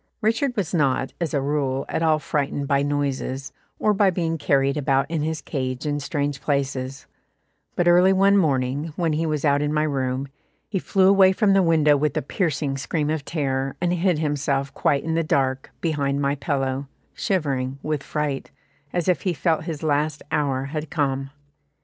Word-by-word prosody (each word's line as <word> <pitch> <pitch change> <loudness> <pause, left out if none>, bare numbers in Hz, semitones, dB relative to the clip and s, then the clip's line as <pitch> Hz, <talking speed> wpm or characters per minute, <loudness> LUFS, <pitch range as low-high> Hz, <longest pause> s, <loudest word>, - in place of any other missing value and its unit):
Richard 230 +3 0
was 190 -5 -1
not, 135 -5 +1
as 170 - -1
a 140 - 0
rule, 140 -1 -1
at - - -2
all 160 -1 +3
frightened 140 -1 -2
by 140 0 +2
noises, 140 -1 -2 0.3
or 210 - +2
by 200 -1 +4
being 165 -3 -1
carried 140 -1 +2
about 135 -2 +1
in 165 -2 0
his 155 0 -2
cage 130 -1 -3
in 145 -1 -1
strange 140 -1 -2
places, 135 -2 -2 0.7
but 175 - +1
early 180 +2 +6
one 195 +1 +4
morning, 145 -3 +1
when 165 -3 0
he 160 +2 0
was 155 -1 -1
out 145 0 +3
in 150 0 0
my 150 0 +1
room, 135 -2 -1 0.4
he 195 - -2
flew 190 +1 +2
away 195 -1 +6
from 195 +1 +3
the 195 - +5
window 160 -4 +4
with 150 0 0
a - - 0
piercing 145 -4 -1
scream 150 +2 -1
of 155 -2 -2
terror, 135 -3 -2
and 175 0 +1
hid 180 -1 +1
himself 140 -2 -1
quite 140 - +1
in 160 - -2
the 165 - +2
dark, 135 -4 0
behind 145 -4 0
my 140 0 +1
pillow, 135 -2 -2 0.3
shivering 135 -8 -1
with 155 -2 -1
fright, 145 -1 -3 0.4
as 175 -2 -1
if 180 -3 +2
he 185 - 0
felt 160 -2 0
his 160 -3 -5
last 150 0 0
hour 140 -4 0
had 155 -1 -3
come. 135 -4 -1
150 Hz, 185 wpm, -23 LUFS, 140-165 Hz, 0.7 s, early